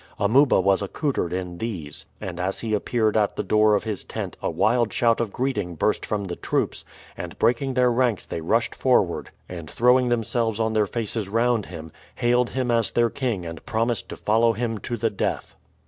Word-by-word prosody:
Amuba 125 Hz, +6 st, +4 dB
was 95 Hz, +2 st, +3 dB
accoutered 100 Hz, -, -2 dB
in 90 Hz, -1 st, -4 dB
these, 90 Hz, -11 st, -5 dB
and 90 Hz, -2 st, -6 dB
as 95 Hz, +2 st, -2 dB
he 110 Hz, -2 st, -2 dB
appeared 110 Hz, +1 st, +1 dB
at 105 Hz, -2 st, +2 dB
the -, -, -2 dB
door 105 Hz, 0 st, +4 dB
of 100 Hz, -, 0 dB
his 105 Hz, -3 st, -4 dB
tent -, -, -5 dB
a -, -, -1 dB
wild 120 Hz, 0 st, +2 dB
shout 115 Hz, -1 st, +2 dB
of 115 Hz, -4 st, -2 dB
greeting 105 Hz, -10 st, -2 dB
burst -, -, 0 dB
from 105 Hz, -1 st, -1 dB
the 90 Hz, -3 st, -4 dB
troops, -, -, -2 dB, 0.3 s
and -, -, -7 dB
breaking 130 Hz, +2 st, +1 dB
their 125 Hz, -1 st, +4 dB
ranks 120 Hz, -4 st, +1 dB
they 80 Hz, -, -5 dB
rushed 80 Hz, -, +1 dB
forward, -, -, +1 dB, 0.2 s
and 85 Hz, -4 st, -8 dB
throwing 125 Hz, +1 st, +3 dB
themselves 115 Hz, -1 st, 0 dB
on 110 Hz, 0 st, +1 dB
their 105 Hz, -1 st, +2 dB
faces 110 Hz, -2 st, -2 dB
round 115 Hz, 0 st, +1 dB
him, 80 Hz, -2 st, -9 dB, 0.2 s
hailed 120 Hz, +1 st, +2 dB
him 130 Hz, -2 st, -1 dB
as 115 Hz, -2 st, +2 dB
their 120 Hz, -1 st, +2 dB
king 115 Hz, -10 st, -2 dB
and 85 Hz, -1 st, -7 dB
promised 115 Hz, +1 st, -1 dB
to -, -, -7 dB
follow 115 Hz, +2 st, +3 dB
him 115 Hz, -1 st, -2 dB
to 120 Hz, +2 st, -4 dB
the 115 Hz, 0 st, 0 dB
death. 100 Hz, -, -3 dB
110 Hz, 195 wpm, -24 LUFS, 100-120 Hz, 0.3 s, Amuba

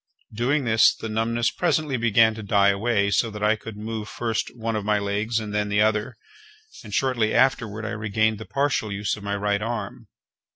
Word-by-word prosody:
Doing 130 Hz, +6 st, 0 dB
this, 110 Hz, -1 st, +5 dB
the 110 Hz, -, -6 dB
numbness 115 Hz, +2 st, 0 dB
presently 155 Hz, -5 st, 0 dB
began 115 Hz, -1 st, +4 dB
to 110 Hz, -, -8 dB
die 100 Hz, -1 st, +3 dB
away 100 Hz, 0 st, +1 dB
so 115 Hz, -, +2 dB
that 105 Hz, -1 st, -7 dB
I 105 Hz, +1 st, +4 dB
could 110 Hz, -1 st, -10 dB
move 110 Hz, 0 st, -5 dB
first 115 Hz, -2 st, -2 dB
one 115 Hz, -1 st, -2 dB
of 105 Hz, -, -2 dB
my 105 Hz, 0 st, +1 dB
legs, 105 Hz, +3 st, -1 dB
and 105 Hz, -2 st, -6 dB
then 105 Hz, 0 st, 0 dB
the 105 Hz, +1 st, +3 dB
other, 105 Hz, -1 st, 0 dB, 0.7 s
and, 105 Hz, -, -11 dB
shortly 120 Hz, -2 st, +1 dB
afterward 110 Hz, -5 st, +1 dB
I -, -, -3 dB
regained 110 Hz, 0 st, 0 dB
the 110 Hz, -, -8 dB
partial 135 Hz, -6 st, -1 dB
use 100 Hz, 0 st, -2 dB
of 105 Hz, -, -11 dB
my 100 Hz, 0 st, -3 dB
right 100 Hz, 0 st, 0 dB
arm. 115 Hz, 0 st, -5 dB
110 Hz, 200 wpm, -24 LUFS, 105-115 Hz, 0.7 s, this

